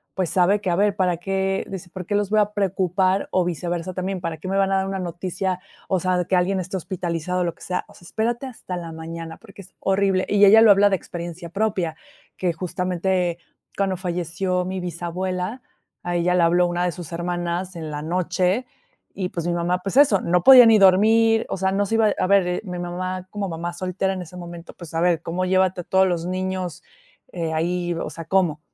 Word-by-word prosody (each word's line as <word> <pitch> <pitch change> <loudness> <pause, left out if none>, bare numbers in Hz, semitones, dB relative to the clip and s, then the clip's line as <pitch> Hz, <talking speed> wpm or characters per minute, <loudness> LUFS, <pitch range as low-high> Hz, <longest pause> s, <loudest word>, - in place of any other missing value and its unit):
pues, 185 -4 -1
sabe 190 +3 +3
que 190 - -2
a 175 - +2
ver 200 +2 +2
para 180 -2 +2
qué, 195 +2 -1
dice: 190 -2 -7
"¿Por 185 0 -7
qué 205 - -3
los 205 -1 0
voy 215 0 +3
a 210 0 0
preocupar? 190 -1 +1
o 185 -1 +2
viceversa, 175 +1 -3
también, 185 0 -3
¿para 165 -2 -3
qué 155 - -8
me 195 - 0
van 195 0 +2
a 195 - +3
dar 190 0 0
una 195 0 -3
noticia, 180 +1 -3 0.3
o 190 - +1
sea, 185 +1 +1
de 180 - 0
que 190 - +1
alguien 185 +2 +1
esté 185 +1 -4
hospitalizado?", 180 -1 -3
o - - +2
lo 170 -1 -3
que - - -24
sea, 180 - -3
o - - -18
sea, 175 - -17
espérate 235 +7 -2
hasta 230 -7 -7
la 170 -1 -6
mañana, 165 0 -7
porque 200 -3 -14
es 185 - -19
horrible 195 -1 +1
y 205 0 +5
ella 220 +3 +8
lo 225 -2 +8
habla 200 +1 +5
de 195 - +1
experiencia 170 0 -7
propia, 190 -4 -1 0.4
que 180 -2 0
justamente 180 0 -1 0.4
cuando 195 -1 0
falleció 180 +1 -2
mi 185 +1 -3
bisabuela, 180 +5 -4 0.4
a 175 0 -2
ella 175 +1 +2
le 180 - +3
habló 175 +1 +4
una 175 0 -1
de 180 - 0
sus 170 -1 -9
hermanas 175 +1 -3
en 160 -2 -6
la 145 0 -4
noche 180 +6 0 0.5
y, 185 -2 -3
pues, 170 -1 -4
mi 175 - 0
mamá, 175 +1 0
pues, 195 +4 -5
eso, 270 -9 +6
no 175 0 +1
podía 255 0 +10
ni 225 -2 +6
dormir, 220 +4 +5
o - - -2
sea, 190 +1 0
no 200 +1 +1
se 225 - -1
iba 220 -2 +3
a - - +1
ver, 185 -2 +2
mi 180 -2 -5
mamá 185 +1 -4
como 205 -2 -3
mamá 170 +1 -4
soltera 185 +2 -2
en 185 - -5
ese 180 0 -10
momento, 170 -1 -9
pues, 170 -3 -11
a 165 - 0
ver 170 -2 +2
cómo 175 +2 -2
llévate 185 0 +2
a - - -12
todos 190 0 +3
los 170 -2 -1
niños, 185 -1 -3 0.5
eh, 165 -3 -3
ahí, 175 +2 -1
o 165 - -4
sea, 165 - -8
¿cómo? 170 -3 +1
180 Hz, 225 wpm, -23 LUFS, 175-195 Hz, 0.5 s, podía